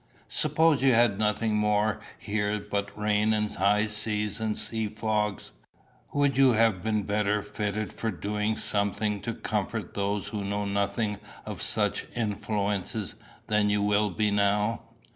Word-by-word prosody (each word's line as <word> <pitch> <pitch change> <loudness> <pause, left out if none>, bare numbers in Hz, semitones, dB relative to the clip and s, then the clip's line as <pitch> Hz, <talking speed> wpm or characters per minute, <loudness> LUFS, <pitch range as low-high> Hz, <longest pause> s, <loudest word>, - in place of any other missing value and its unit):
Suppose 160 -4 +3
you 135 -1 +5
had 120 0 +5
had 100 - -8
nothing 105 0 +1 0.6
here 105 0 -1
but 100 0 -2
rain 105 +1 +2
and 105 -1 0
high 105 +3 +2 0.2
winds 105 -1 -1
and 110 -1 -1
sea 110 -1 -2
fogs, 105 -1 -2 0.6
would 140 -2 +2
you 135 -2 +6
have 110 -4 +3
been 110 0 0
better 105 +1 0
fitted 105 0 -3
for 115 - -2
doing 105 0 -1
something 100 0 -1
to 115 -1 -3
comfort 105 -1 -3
those 100 0 -1
who 105 -2 -3
know 100 +1 -2
nothing 100 +1 -1 0.3
of - - -6
such - - 0
influences 105 -2 -2 0.3
than 105 -1 +2
you 105 0 +1
will 105 0 +2
be 105 +3 0
now? 105 +2 +1
105 Hz, 145 wpm, -28 LUFS, 100-110 Hz, 0.6 s, you